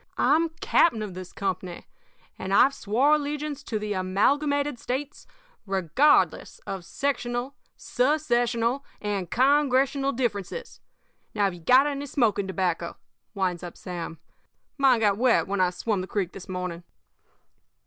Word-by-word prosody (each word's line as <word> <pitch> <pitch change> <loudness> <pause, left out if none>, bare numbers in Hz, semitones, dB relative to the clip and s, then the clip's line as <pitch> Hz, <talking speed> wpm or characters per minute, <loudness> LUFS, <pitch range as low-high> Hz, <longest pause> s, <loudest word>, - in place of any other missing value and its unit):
I'm 325 +3 +3
captain 335 - +3
of 205 -3 -6
this 185 0 -8
company, 185 -2 -4 0.5
and 190 +1 -1
I've 275 +6 +6
swore 260 +4 +2
allegiance 295 -1 -2
to 225 - -2
the 210 0 -3
Amalgamated 280 +9 +1
States 270 +5 -5 0.4
regardless 195 - +2
of 190 -2 -5
sectional, 245 +2 -2 0.2
secessional, 245 -2 +1 0.2
and 200 -4 -3
Congressional 275 +1 +2
differences. 235 - -4 0.6
Have 200 -3 +1
you 175 - -10
got 255 - +5
any 285 -1 -3
smoking 215 -8 +1
tobacco?' 180 -3 -2 0.4
winds 185 -3 -1
up 175 -1 -8
Sam. 170 -2 -6 0.6
'Mine 260 -4 +4
got 205 -2 +3
wet 250 -1 +3
when 200 0 -1
I 180 - +4
swum 190 +2 -2
the 185 - -6
creek 190 -4 -2
this 190 - -11
morning.' 180 -2 -4
230 Hz, 130 wpm, -26 LUFS, 190-275 Hz, 0.6 s, I've